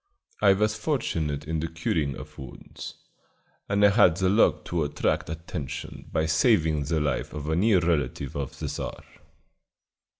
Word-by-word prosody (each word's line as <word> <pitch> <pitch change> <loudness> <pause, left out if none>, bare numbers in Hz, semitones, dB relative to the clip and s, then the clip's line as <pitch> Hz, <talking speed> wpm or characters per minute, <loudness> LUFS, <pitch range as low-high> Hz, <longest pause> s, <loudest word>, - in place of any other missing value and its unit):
I 100 -2 +6
was 105 +2 +1
fortunate 80 - -1
in 80 0 -1
the 80 - -2
curing 80 -3 -1
of - - -11
wounds, 65 -3 -9 0.7
and 100 +1 +4
I - - +8
had 100 -5 +5
the 95 -1 +2
luck 105 +4 +3
to 85 -2 -1
attract 75 - -1
attention 80 -4 -6
by 80 - +1
saving 80 - +3
the 80 +2 0
life 70 -3 -1
of 75 0 -5
a 80 - +1
near 100 +3 +4
relative 70 -5 -1
of 70 -3 -4
the - - -4
Czar. - - -5
80 Hz, 160 wpm, -26 LUFS, 75-95 Hz, 0.7 s, I